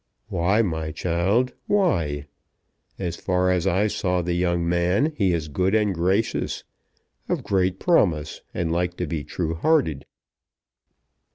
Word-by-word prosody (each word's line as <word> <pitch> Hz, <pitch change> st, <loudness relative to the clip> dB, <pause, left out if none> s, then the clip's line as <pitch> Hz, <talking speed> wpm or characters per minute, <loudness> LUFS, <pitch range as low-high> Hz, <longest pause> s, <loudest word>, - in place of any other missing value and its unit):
"Why, 100 Hz, +7 st, +2 dB
my 80 Hz, -5 st, -2 dB
child, 95 Hz, +11 st, +1 dB
why? 85 Hz, -, +1 dB, 0.7 s
As 90 Hz, -2 st, -3 dB
far 90 Hz, 0 st, +1 dB
as 90 Hz, 0 st, +1 dB
I 95 Hz, +3 st, +2 dB
saw 90 Hz, -4 st, 0 dB
the 85 Hz, 0 st, -1 dB
young 85 Hz, -1 st, 0 dB
man 90 Hz, -, +2 dB
he 100 Hz, -7 st, +2 dB
is 80 Hz, -3 st, -1 dB
good 90 Hz, +7 st, +1 dB
and 105 Hz, -2 st, +2 dB
gracious, 95 Hz, +6 st, 0 dB, 0.7 s
of -, -, -1 dB
great 95 Hz, -1 st, +1 dB
promise, 85 Hz, -, +1 dB
and 85 Hz, -2 st, -2 dB
like 90 Hz, +1 st, -1 dB
to 90 Hz, -, -1 dB
be 75 Hz, -1 st, -3 dB
true 80 Hz, 0 st, -3 dB
hearted." 85 Hz, -, +1 dB
90 Hz, 135 wpm, -24 LUFS, 85-100 Hz, 0.7 s, Why